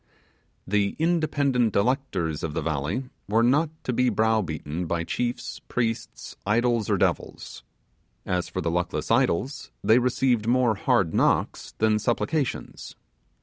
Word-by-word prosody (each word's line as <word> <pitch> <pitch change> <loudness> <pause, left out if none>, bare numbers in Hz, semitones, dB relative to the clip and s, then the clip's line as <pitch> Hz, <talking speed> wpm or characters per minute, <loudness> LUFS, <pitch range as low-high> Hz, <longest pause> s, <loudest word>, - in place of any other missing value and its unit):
The 100 +1 0
'independent 145 -8 +1
electors' 100 - 0
of 75 -2 -4
the - - 0
valley 80 - -2 0.3
were 115 +3 +3
not 145 +6 +3
to 125 - -2
be 125 +1 +2
brow 110 0 +2
beaten 80 0 -4
by 85 0 -1
chiefs, 120 +8 -3
priests, 115 -2 -3
idol 115 +2 +2
or - - +2
devils. - - -2 0.6
As 90 -1 -1
for 95 - -3
the 85 -1 -1
luckless 90 +1 -2
idols, 130 - +1
they 110 +3 +5
received 125 -2 +1
more 125 -1 +3
hard 95 -4 +1
knocks - - +1
than 110 -1 +2
supplications. 135 +5 -2
110 Hz, 135 wpm, -25 LUFS, 90-125 Hz, 0.6 s, they